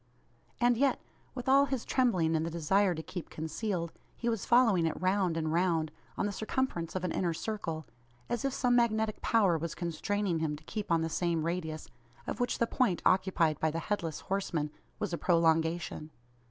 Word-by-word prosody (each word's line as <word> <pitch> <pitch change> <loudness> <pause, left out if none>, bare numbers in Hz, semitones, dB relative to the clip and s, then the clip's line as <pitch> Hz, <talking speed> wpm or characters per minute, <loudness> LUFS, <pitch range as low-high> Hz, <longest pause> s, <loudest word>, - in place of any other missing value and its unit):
And 240 -1 +4
yet, 275 +2 +2 0.4
with 250 -1 -6
all 275 +1 +6
his 265 -4 -3
trembling 185 -11 +2
and 160 - +1
the 165 - -2
desire 175 +3 +2
to 160 - -5
keep 175 0 -7
concealed, 170 +2 -3 0.3
he 235 - -1
was 225 -4 -2
following 225 -9 +5
it 160 - -3
round 185 -2 +1
and 160 -1 -1
round, 165 -3 +1 0.3
on - - 0
the 205 - -1
circumference 210 -6 -2
of 185 - -2
an 180 - -1
inner 170 -3 0
circle, 165 -7 -4 0.4
as 240 - -2
if 275 - +1
some 245 -2 +2
magnetic 220 -2 +1
power 195 -8 +3
was 165 +1 -4
constraining 175 +1 -1
him 155 -2 -1
to 150 - -13
keep 210 +3 -5
on 165 -1 +4
the 165 - 0
same 165 -1 0
radius, 160 -2 -3 0.4
of - - -4
which 245 0 0
the 235 - +2
point 230 -7 +1
occupied 185 -5 +3
by 160 - +2
the 160 - -3
Headless 165 -4 -2
Horseman 170 -6 -2 0.3
was - - -3
a 170 - -2
prolongation! 165 -2 +1
175 Hz, 190 wpm, -31 LUFS, 160-220 Hz, 0.4 s, all